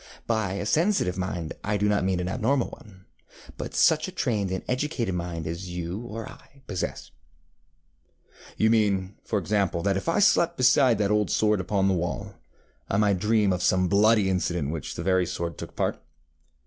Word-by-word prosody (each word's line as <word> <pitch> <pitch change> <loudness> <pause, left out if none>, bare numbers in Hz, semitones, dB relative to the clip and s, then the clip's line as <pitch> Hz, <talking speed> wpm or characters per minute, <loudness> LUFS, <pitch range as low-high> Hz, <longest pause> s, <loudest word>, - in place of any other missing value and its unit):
By 110 -5 0
a 100 - -3
sensitive 160 - +1
mind 90 -4 -3
I 105 0 0
do 105 +1 +1
not 105 -2 +2
mean 95 -1 0
an 90 - -2
abnormal 125 +5 0
one, 95 -4 -15 0.5
but - - -6
such 155 -1 +4
a - - -6
trained 110 - -1
and 95 0 -3
educated 125 - -1
mind 85 -2 -4
as 85 +3 -5
you 90 +2 -4
or 115 -2 -7
I 140 -1 -16
possess. 95 -6 -4 1.5
ŌĆØ - - +3
ŌĆ£You - - +5
mean, 100 -4 +1
for 110 - -1
example, 100 -2 0
that 100 -1 +1
if 95 - -3
I 165 - +1
slept 170 -4 +3
beside 130 -1 +4
that 105 -1 +1
old 105 -2 +2
sword 105 -2 +2
upon 95 +1 0
the 95 - +3
wall, 90 -1 -3 0.6
I 95 - +1
might 100 -3 +2
dream 105 -1 +2
of 90 - -2
some 95 0 +2
bloody 105 +1 +4
incident 85 -5 -1
in - - -2
which 80 -4 -5
that 80 - -4
very 95 -1 +2
sword 85 -1 -4
took - - -8
part? - - -1
100 Hz, 190 wpm, -26 LUFS, 90-110 Hz, 1.5 s, ŌĆ£You